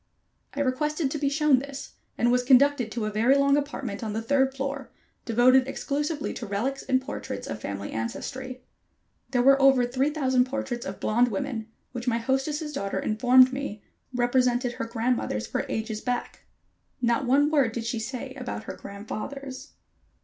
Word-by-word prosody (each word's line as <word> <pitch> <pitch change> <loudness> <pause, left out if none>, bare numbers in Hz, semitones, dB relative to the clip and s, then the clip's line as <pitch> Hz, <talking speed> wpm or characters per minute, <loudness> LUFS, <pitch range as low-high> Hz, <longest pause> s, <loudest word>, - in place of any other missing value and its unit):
I 285 - -1
requested 295 +2 0
to 300 - -3
be 280 -1 +1
shown 295 -2 +3
this, 275 0 -8 0.3
and 240 0 +3
was 250 0 +3
conducted 260 -2 +4
to 230 -2 -2
a 215 - -2
very 235 +6 +3
long 280 0 +4
apartment 275 -7 -3
on 215 -2 -3
the 220 - -2
third 270 +2 +2
floor, 275 0 -4 0.4
devoted 255 +3 +4
exclusively 290 +2 -2
to 230 - -6
relics 235 +8 -2
and 260 - +1
portraits 260 +2 -6
of 110 -1 -6
family 100 -1 -5
ancestry. 255 - -5 0.7
There 245 -2 +2
were 275 +1 +6
over 270 -2 +6
three 260 +4 0
thousand 260 -4 +2
portraits 265 -2 -4
of 190 - -6
blond 240 +3 +3
women, 225 +1 -3 0.2
which 245 0 -6
my 230 -2 +2
hostess' 270 +5 -1
daughter 200 -8 -3
informed 255 +4 +5
me 265 -6 -5 0.3
represented 245 0 +2
her 240 - -4
grandmothers 230 - -1
for - - -3
ages 220 -1 -3
back. 245 -1 -3 0.5
Not 240 +1 +1
one 290 +4 +4
word 275 -7 +3
did 230 0 -4
she 230 0 -2
say 240 +3 -5
about - - -5
her - - -6
grandfathers. 255 +7 -7
255 Hz, 170 wpm, -26 LUFS, 230-275 Hz, 0.7 s, were